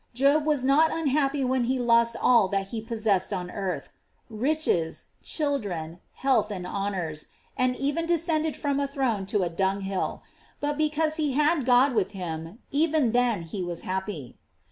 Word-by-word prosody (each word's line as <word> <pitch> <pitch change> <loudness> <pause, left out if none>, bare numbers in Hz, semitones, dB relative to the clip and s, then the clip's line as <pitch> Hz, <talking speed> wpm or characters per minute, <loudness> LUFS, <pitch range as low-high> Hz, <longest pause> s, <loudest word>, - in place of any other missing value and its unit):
Job 285 +4 +3
was 290 -4 +1
not 300 +4 +5
unhappy 285 -3 +1
when 255 -1 +1
he 260 +2 0
lost 235 -1 +3
all 235 -6 +5
that 195 0 -2
he 225 0 -4
possessed 215 -4 0
on 180 -2 -3
earth; 195 -3 -4 0.4
riches, 225 - 0
children, 200 - -3
health, 265 -4 +1
and 185 -4 -5
honors, 180 -6 -3 0.3
and 255 0 +1
even 290 +5 -1
de 345 - +3
scended 315 -2 0
from 280 -1 -1
a 280 - 0
throne 255 -9 -1
to 200 -1 +1
a - - +1
dunghill; 190 +2 -2 0.4
but 290 0 -1
because 310 +1 0
lie 295 -3 +1
had 300 -1 +2
God 255 +2 +5
with 210 -3 0
him, 165 0 -6
even 300 -4 +2
then 240 -6 +2
he 175 +4 -5
was 175 -1 -4
happy. 185 - -4
240 Hz, 165 wpm, -26 LUFS, 190-285 Hz, 0.4 s, not